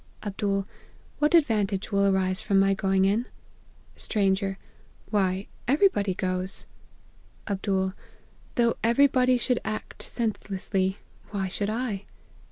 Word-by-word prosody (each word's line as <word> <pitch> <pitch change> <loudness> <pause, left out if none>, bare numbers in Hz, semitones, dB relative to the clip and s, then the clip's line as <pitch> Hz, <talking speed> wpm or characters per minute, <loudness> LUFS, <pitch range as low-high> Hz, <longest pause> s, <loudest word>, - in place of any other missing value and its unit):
" - - -19
Md* 195 -1 -1 0.3
' - - -29
What 300 +3 +4
advantage 210 - +2
will 200 0 +3
arise 190 -1 +1
from 200 - +1
my 195 0 +4
going 190 0 +2
in 215 +5 +1 0.2
?' - - -31
" - - -29
Stranger. 195 -2 0 0.3
* - - -29
Why, 195 -2 +1 0.2
every 300 +10 +5
body 200 - -1
goes.' 185 +1 -1 0.4
" - - -31
Md. 190 -2 -1 0.3
' - - -30
Though 235 -3 +2
every 235 +5 +5
body 255 -2 +3
should 245 0 +1
act 215 0 -5
sense 225 -3 -2
lessly, 190 0 -1 0.3
why 195 -2 -2
should 200 +2 -2
1 220 -2 -2
200 Hz, 155 wpm, -27 LUFS, 190-230 Hz, 0.4 s, every